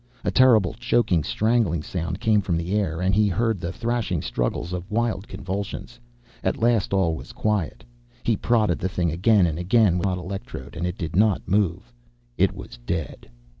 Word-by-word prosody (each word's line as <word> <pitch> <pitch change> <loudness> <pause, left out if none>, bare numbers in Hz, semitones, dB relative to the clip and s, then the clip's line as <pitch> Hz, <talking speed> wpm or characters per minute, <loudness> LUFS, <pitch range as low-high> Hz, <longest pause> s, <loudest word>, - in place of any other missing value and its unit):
A - - 0
terrible 115 -8 +5
choking, 115 -7 +1
strangling 110 -4 +1
sound 85 +1 -4
came 110 -2 +3
from 90 -4 -1
the 85 +3 -3
air. 95 -5 0
And 95 +1 +1
he 105 +1 +4
heard 110 +2 0
the 85 +2 -3
thrashing 115 -6 -2
struggles 60 +8 -2
of 90 +2 -5
wild 110 -2 -1
convulsions. 100 +2 -5 0.4
At - - 0
last 115 -3 +2
all 95 -4 +2
was - - -9
quiet. 105 -6 -1 0.4
He 115 - +2
prodded 110 -6 +1
the 95 - -1
thing 85 -2 0
again 95 +4 +4
and 80 -1 -2
again 95 0 +3
with 85 - -1
the - - +2
hot 90 - -1
electrode, 90 - -7
and 85 +2 -2
it 90 - -4
did 80 -3 -4
not 105 0 +2
move. 95 -9 0 0.4
It - - +3
was - - -10
dead. 80 -3 -4
95 Hz, 185 wpm, -24 LUFS, 85-110 Hz, 0.4 s, terrible